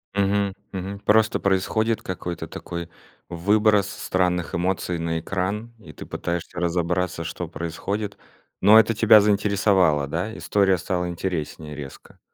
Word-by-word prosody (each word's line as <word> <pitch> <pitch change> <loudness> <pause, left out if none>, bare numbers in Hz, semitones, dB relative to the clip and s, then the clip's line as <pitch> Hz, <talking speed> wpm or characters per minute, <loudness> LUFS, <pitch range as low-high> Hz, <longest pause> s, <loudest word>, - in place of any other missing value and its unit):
Мгм, 100 0 +1 0.2
мгм. 95 +1 -5
Просто 110 +1 +3
происходит 110 +4 +1
какой-то 90 -2 -5
такой 85 -1 -7 0.4
выброс 105 +3 +3
странных 90 -4 -1
эмоций 90 0 -1
на 80 0 -2
экран 100 +7 -3
и - - -13
ты - - -10
пытаешься 85 0 -4
разобраться 85 0 -1
что 85 +1 -5
происходит, 100 +5 -4 0.4
но 105 +3 +8
это 110 +1 +3
тебя 110 -1 +7
заинтересовало, 100 -7 +2
да? 90 +9 -3
История 95 -2 +2
стала 90 0 -2
интереснее 80 -4 -4
резко. 70 -2 -11
95 Hz, 125 wpm, -23 LUFS, 85-105 Hz, 0.4 s, но